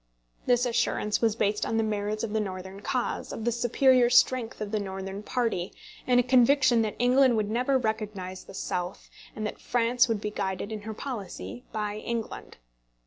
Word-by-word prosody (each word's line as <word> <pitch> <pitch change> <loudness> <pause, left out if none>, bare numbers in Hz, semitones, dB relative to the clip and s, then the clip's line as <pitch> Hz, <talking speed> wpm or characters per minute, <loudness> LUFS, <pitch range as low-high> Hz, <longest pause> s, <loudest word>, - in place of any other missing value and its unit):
This 245 0 +3
assurance 235 -3 0
was 225 -2 +2
based 210 -1 0
on 225 - -1
the 225 - +2
merits 210 0 -2
of 220 -2 -3
the 220 - +1
Northern 190 -1 -5
cause, 245 +4 -2
on 225 - -5
the 240 - +1
superior 245 +1 +4
strength 245 -1 +3
of 210 -1 -4
the 215 - 0
Northern 195 0 -5
party, 215 -6 -2 0.3
and 250 - +2
on 245 - +2
a - - -17
conviction 255 -1 +5
that 215 -2 -2
England 250 0 +4
would 210 -1 -1
never 255 +4 +2
recognise 215 -5 -3
the 195 - -11
South, 180 -1 -4 0.2
and 215 - -3
that 210 - -5
France 245 +1 +2
would 225 -3 0
be 210 +1 -4
guided 195 0 -3
in 215 -1 -4
her 220 - -5
policy 240 0 -6
by 210 -1 -3
England. 230 +1 -5
220 Hz, 190 wpm, -27 LUFS, 205-245 Hz, 0.3 s, conviction